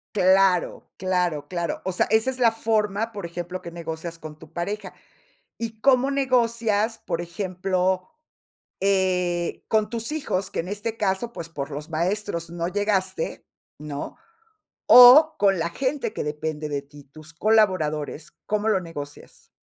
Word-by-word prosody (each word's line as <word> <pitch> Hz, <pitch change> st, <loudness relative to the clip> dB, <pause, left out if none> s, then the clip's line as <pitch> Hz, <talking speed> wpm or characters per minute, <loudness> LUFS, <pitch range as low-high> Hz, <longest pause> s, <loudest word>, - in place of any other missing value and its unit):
Claro, 190 Hz, -2 st, +3 dB
claro, 180 Hz, -5 st, -1 dB
claro. 170 Hz, -2 st, -3 dB
O 190 Hz, -, 0 dB
sea, 180 Hz, -, +1 dB
esa 220 Hz, +4 st, +3 dB
es 260 Hz, -, -10 dB
la 235 Hz, -2 st, +5 dB
forma, 220 Hz, -1 st, 0 dB
por 200 Hz, -5 st, -6 dB
ejemplo, 175 Hz, +2 st, -6 dB
que -, -, -7 dB
negocias 165 Hz, 0 st, -6 dB
con 155 Hz, -2 st, -10 dB
tu -, -, -14 dB
pareja, 200 Hz, +3 st, -4 dB, 0.6 s
¿y 225 Hz, -1 st, -6 dB
cómo 265 Hz, +1 st, +4 dB
negocias, 235 Hz, -5 st, +1 dB
por 170 Hz, -1 st, -3 dB
ejemplo, 185 Hz, -, -1 dB, 0.7 s
eh, 180 Hz, -3 st, 0 dB
con 215 Hz, -1 st, +1 dB
tus 230 Hz, +3 st, -4 dB
hijos?, 200 Hz, -11 st, -2 dB
que -, -, -2 dB
en 170 Hz, -, -7 dB
este 205 Hz, +3 st, -4 dB
caso, 205 Hz, +3 st, -1 dB
pues, 165 Hz, -, -7 dB
por 140 Hz, -2 st, -5 dB
los 150 Hz, +2 st, -7 dB
maestros 170 Hz, +1 st, -2 dB
no 170 Hz, 0 st, -3 dB
llegaste, 190 Hz, -3 st, -1 dB, 0.3 s
¿no?, 145 Hz, -1 st, -6 dB, 0.7 s
o 265 Hz, +6 st, +9 dB
con 195 Hz, -2 st, +3 dB
la 165 Hz, +1 st, -1 dB
gente 270 Hz, -, -2 dB
que -, -, -4 dB
depende 150 Hz, 0 st, -4 dB
de 145 Hz, -1 st, -3 dB
ti, 145 Hz, 0 st, -16 dB
tus 155 Hz, +4 st, -14 dB
colaboradores, 170 Hz, -7 st, +1 dB
¿cómo 210 Hz, +1 st, 0 dB
lo 205 Hz, -3 st, +2 dB
negocias? 145 Hz, -4 st, -10 dB
185 Hz, 150 wpm, -24 LUFS, 165-220 Hz, 0.7 s, o